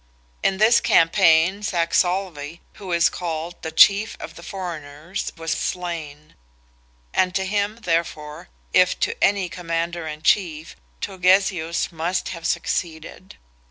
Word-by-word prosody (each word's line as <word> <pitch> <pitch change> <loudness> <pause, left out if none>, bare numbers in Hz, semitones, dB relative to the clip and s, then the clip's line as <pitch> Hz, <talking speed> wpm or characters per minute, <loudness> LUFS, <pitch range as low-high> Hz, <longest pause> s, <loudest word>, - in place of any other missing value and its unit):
In 190 - +1
this 220 +4 +5
campaign 170 +2 +4
Saxolve, 170 -3 -1 0.2
who 190 -3 -7
is 170 -1 +4
called 170 -1 -5
"the 160 - -4
chief 200 +7 +5
of - - -8
the - - -12
foreigners," 170 -2 -6
was 165 0 -4
slain; 155 -4 -4 0.8
and 180 -1 +1
to 190 - 0
him, 205 +2 -1
therefore, 165 -2 -2 0.2
if 180 0 +4
to - - 0
any 195 -2 +2
commander 170 -1 -3
in 155 0 -7
chief, 165 -6 +1 0.3
Turgesius 185 -3 +1
must 170 +2 -2
have 170 -2 -5
succeeded. 170 +2 -4
170 Hz, 125 wpm, -22 LUFS, 160-190 Hz, 0.8 s, this